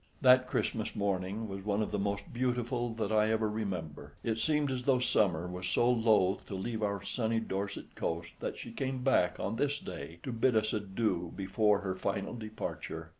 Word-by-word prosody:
That 130 Hz, -1 st, +6 dB
Christmas 110 Hz, -3 st, -1 dB
morning 100 Hz, +2 st, -1 dB
was 95 Hz, -1 st, -6 dB
one 105 Hz, +1 st, +1 dB
of -, -, -4 dB
the 105 Hz, -, 0 dB
most 100 Hz, 0 st, -2 dB
beautiful 120 Hz, -1 st, 0 dB
that 110 Hz, -2 st, -1 dB
I 110 Hz, 0 st, +4 dB
ever 110 Hz, 0 st, +2 dB
remember. 95 Hz, -8 st, -4 dB
It 115 Hz, -1 st, 0 dB
seemed 150 Hz, 0 st, +2 dB
as 130 Hz, -1 st, -1 dB
though 130 Hz, 0 st, +3 dB
summer 90 Hz, -8 st, +2 dB
was 90 Hz, 0 st, -4 dB
so 120 Hz, +7 st, +3 dB
loath 110 Hz, -5 st, +3 dB
to 100 Hz, -, -4 dB
leave 110 Hz, +3 st, -3 dB
our 100 Hz, -2 st, -1 dB
sunny 115 Hz, +1 st, 0 dB
Dorset 100 Hz, -2 st, -4 dB
coast 85 Hz, +1 st, -3 dB
that -, -, -3 dB
she -, -, -7 dB
came 130 Hz, -1 st, -3 dB
back 130 Hz, -9 st, +3 dB
on 110 Hz, +3 st, -2 dB
this 145 Hz, +2 st, +1 dB
day 85 Hz, -, -7 dB
to -, -, -3 dB
bid 115 Hz, +1 st, +2 dB
us 110 Hz, 0 st, +1 dB
adieu 95 Hz, -4 st, -1 dB
before 100 Hz, +1 st, +2 dB
her 95 Hz, -2 st, -1 dB
final 100 Hz, +2 st, -2 dB
departure. 110 Hz, -7 st, -5 dB
105 Hz, 190 wpm, -32 LUFS, 95-120 Hz, -, That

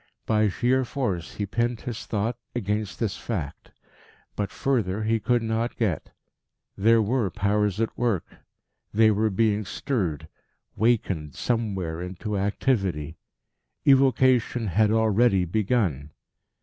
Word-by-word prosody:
By 110 Hz, -1 st, +2 dB
sheer 125 Hz, +6 st, +1 dB
force 110 Hz, -10 st, -3 dB
he 105 Hz, -, -2 dB
pinned 120 Hz, +3 st, -1 dB
his 120 Hz, -3 st, -6 dB
thought 110 Hz, +3 st, -1 dB, 0.2 s
against 105 Hz, -2 st, -2 dB
this 110 Hz, -4 st, -1 dB
fact: 85 Hz, -12 st, -5 dB, 0.7 s
but 100 Hz, -1 st, -2 dB
further 110 Hz, -7 st, -1 dB
he 115 Hz, +1 st, +1 dB
could 120 Hz, +3 st, +1 dB
not 115 Hz, +1 st, -1 dB
get. 100 Hz, -10 st, -1 dB, 0.7 s
There 115 Hz, +2 st, +4 dB
were 115 Hz, -1 st, 0 dB
Powers 105 Hz, +2 st, 0 dB
at 115 Hz, -, -1 dB
work; 115 Hz, -8 st, 0 dB, 0.7 s
they 110 Hz, +1 st, +5 dB
were 110 Hz, +1 st, +1 dB
being 105 Hz, +1 st, +1 dB
stirred, 90 Hz, -, -2 dB, 0.5 s
wakened 95 Hz, -, 0 dB
somewhere 95 Hz, -9 st, -2 dB
into 95 Hz, +4 st, -4 dB
activity. 95 Hz, -, -1 dB, 0.7 s
Evocation 130 Hz, -3 st, +4 dB
had 105 Hz, +4 st, +3 dB
already 110 Hz, -3 st, +3 dB
begun. 95 Hz, -, 0 dB
110 Hz, 120 wpm, -25 LUFS, 95-120 Hz, 0.7 s, they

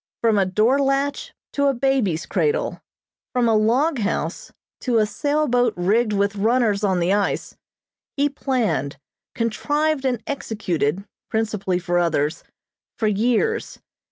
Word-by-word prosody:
From 225 Hz, -3 st, +3 dB
a 190 Hz, -, +2 dB
door 220 Hz, +8 st, +2 dB
latch 275 Hz, +1 st, 0 dB, 0.2 s
to 280 Hz, 0 st, +2 dB
a 275 Hz, -, +2 dB
baby's 240 Hz, -11 st, +1 dB
cradle, 450 Hz, -, -1 dB, 0.5 s
from 245 Hz, -2 st, +2 dB
a 225 Hz, -, +3 dB
log 250 Hz, +7 st, +2 dB
house 205 Hz, -1 st, -2 dB, 0.3 s
to 245 Hz, -3 st, 0 dB
a 215 Hz, -, +4 dB
sail 295 Hz, +7 st, 0 dB
boat 245 Hz, -1 st, +2 dB
rigged 215 Hz, +6 st, +2 dB
with 200 Hz, 0 st, 0 dB
runners 220 Hz, -1 st, +2 dB
on 190 Hz, -3 st, +2 dB
the 175 Hz, +3 st, +2 dB
ice, 205 Hz, -1 st, -1 dB, 0.6 s
he 285 Hz, +1 st, +3 dB
planned, 255 Hz, -, -1 dB, 0.4 s
contrived 290 Hz, +6 st, 0 dB
and 245 Hz, -4 st, -1 dB
executed, 195 Hz, -, -2 dB, 0.2 s
principally 210 Hz, -4 st, -1 dB
for 175 Hz, 0 st, 0 dB
others, 155 Hz, -2 st, 0 dB, 0.5 s
for 220 Hz, -, -1 dB
years. 240 Hz, -, 0 dB
225 Hz, 135 wpm, -22 LUFS, 200-270 Hz, 0.6 s, a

